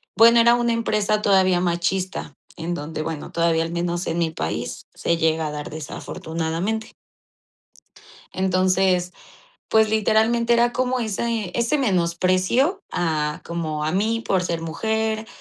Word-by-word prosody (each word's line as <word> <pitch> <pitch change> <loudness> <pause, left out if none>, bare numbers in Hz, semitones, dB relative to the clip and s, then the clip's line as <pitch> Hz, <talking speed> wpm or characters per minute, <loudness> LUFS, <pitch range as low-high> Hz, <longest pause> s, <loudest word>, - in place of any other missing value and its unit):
bueno, 230 +3 +7
era 235 +1 +6
una 240 -1 +1
empresa 215 -2 0
todavía 185 -3 +3
machista, 180 +2 -2 0.2
en 175 +2 -3
donde, 155 0 -5
bueno, 160 -1 -5
todavía 165 -1 +2
al 165 - -5
menos 175 +1 -2
en 165 +1 -1
mi 165 -1 +1
país - - -4
se 170 - 0
llega 160 -1 +1
a - - -4
dar, 150 0 -6
desafortunadamente. 165 +7 -4 1.4
Entonces, 185 -1 +2 0.6
pues, 220 -1 +4
literalmente 220 +2 +2
era 240 +1 +3
como 255 0 0
ese 220 -2 -2
ese 235 +6 +1
menosprecio 185 - +1
a 150 -3 -1
como 155 -3 -3
a 155 - -1
mí 220 +4 +1
por 185 -2 +2
ser 170 -2 -2
mujer, 220 +6 -2
185 Hz, 135 wpm, -22 LUFS, 165-220 Hz, 1.4 s, bueno